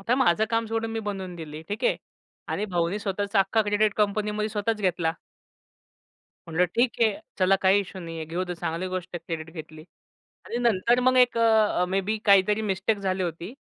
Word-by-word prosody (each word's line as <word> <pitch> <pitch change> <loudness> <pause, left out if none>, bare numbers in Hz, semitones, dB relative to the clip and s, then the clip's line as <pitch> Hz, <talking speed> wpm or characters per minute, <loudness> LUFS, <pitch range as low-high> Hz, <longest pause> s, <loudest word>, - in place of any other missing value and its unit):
आता 230 +5 +1
माझं 220 -6 +3
काम 230 0 +1
सोडून 225 0 -2
मी 225 - -2
बनवून 195 -4 -5
दिली, 155 -1 -8
ठीक 205 +1 -4
आहे, - - +3 0.5
आणि 205 - -1
भाऊनी 175 +1 -1
स्वतःचा 200 0 -1
अख्खा 195 +3 +3
क्रेडिट 205 0 +1
कंपनीमध्ये 210 0 0
स्वतःच 215 +1 -2
घेतला. 175 -4 +1 1.3
म्हटलं 165 +2 +2
ठीक 240 +1 +3
आहे, 220 -3 +2 0.2
चला 190 +1 +4
काही 190 +2 +5
इश्यू 190 -1 -8
नाही 165 -1 -7
आहे 160 - -4
घेऊ 175 +3 -2
दे 180 - -5
चांगली 170 +1 -3
गोष्ट 185 -1 -4
आहे - - -2 0.2
क्रेडिट 160 0 -7
घेतली. 155 -1 -9 0.6
आणि - - -5
नंतर 235 +1 +2
मग 255 +1 +3
एक 245 -2 +4
अ, 220 -5 +3
मे 190 +1 +1
बी 210 +3 -2
काहीतरी 200 +1 +5
मिस्टेक 195 +3 -1
झाली 190 -1 -1
होती 170 +3 -4
200 Hz, 190 wpm, -26 LUFS, 180-220 Hz, 1.3 s, काही